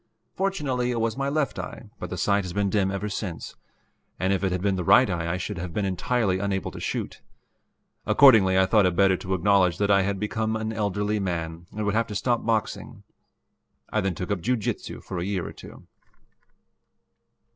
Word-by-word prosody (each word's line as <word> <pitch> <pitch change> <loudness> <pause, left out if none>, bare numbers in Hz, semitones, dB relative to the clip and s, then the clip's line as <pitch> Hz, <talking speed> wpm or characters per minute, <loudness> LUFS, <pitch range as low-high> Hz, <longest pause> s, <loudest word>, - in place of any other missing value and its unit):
Fortunately 145 -11 -1
it 120 -2 -1
was 115 -1 0
my 135 0 -1
left 145 -4 -1
eye, - - -8
but - - -5
the - - -5
sight 100 0 +2
has 90 -2 -6
been 100 0 0
dim 100 -2 +2
ever 100 +2 -3
since, 95 -4 -5 0.6
and 95 +3 +1
if 95 - -1
it 95 - +1
had 90 - -1
been 100 -1 +2
the 90 - -2
right 125 +9 +6
eye 85 -3 -2
I 90 - -1
should 95 0 -4
have 85 -1 -6
been 105 - 0
entirely 95 +1 0
unable 95 -1 -2
to - - -9
shoot. - - -4 0.9
Accordingly 105 -9 +6
I 95 - +5
thought 100 0 +4
it 90 - -1
better 95 0 +4
to 95 +1 -2
acknowledge 95 -1 +3
that 100 0 +1
I 100 -1 +5
had 100 0 -1
become 110 +1 -1
an 110 0 -3
elderly 105 0 -1
man 85 -3 -4
and 105 0 -4
would 100 - 0
have 115 +1 +1
to 105 - -6
stop 120 +3 0
boxing. 110 -2 -2 0.9
I 110 - +2
then 95 -3 -1
took 90 +5 -4
up 100 -4 -1
jiu 125 +7 +1
jitsu 110 - -4
for 90 - -5
a - - -2
year 95 -2 -2
or - - -8
two. - - -13
100 Hz, 210 wpm, -25 LUFS, 95-110 Hz, 0.9 s, right